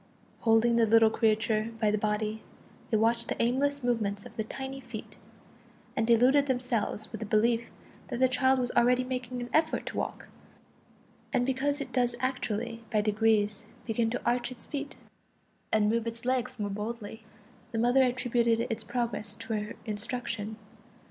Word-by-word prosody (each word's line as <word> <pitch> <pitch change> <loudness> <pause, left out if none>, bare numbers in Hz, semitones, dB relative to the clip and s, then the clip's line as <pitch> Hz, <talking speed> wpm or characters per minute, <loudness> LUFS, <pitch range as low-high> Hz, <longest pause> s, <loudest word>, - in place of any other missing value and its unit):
Holding 230 +1 +4
the 230 -1 +4
little 225 0 +6
creature 220 0 +1
by 215 -2 +3
the 210 - +1
body, 215 +1 -1 0.5
they 220 - +2
watched 230 +2 +2
the - - -3
aimless 275 +4 +1
movements 210 -5 -1
of - - -12
the 220 - -1
tiny 265 +4 -6
feet, - - -9 0.8
and 225 - +1
deluded 255 +5 +5
themselves 245 -4 -1
with - - -6
the 220 - -3
belief 230 +2 +2 0.4
that 245 -3 -4
the 260 - +5
child 260 +1 +3
was 245 -1 0
already 245 +1 +4
making 250 -1 -4
an 245 - -5
effort 315 0 +2
to - - -4
walk; - - -4 1.0
and 250 -2 +2
because 275 +3 +1
it 280 - -6
does 245 -2 +1
actually 235 -3 -2
by 215 - +3
degrees 210 0 +1 0.2
begin 225 0 +1
to 245 - -4
arch 240 0 +1
its 250 -2 -8
feet 285 -1 -5 0.8
and 215 -1 +3
move 230 +1 +1
its 230 +1 -6
legs 255 0 0
more 205 -2 -2
boldly, 220 +1 -5 0.5
the 230 - -3
mother 245 +3 +4
attributed 240 -2 +2
its 225 0 -2
progress 220 -3 -2
to 225 0 -5
her 210 0 -3
instruction. 220 0 -3
235 Hz, 165 wpm, -29 LUFS, 220-250 Hz, 1.0 s, little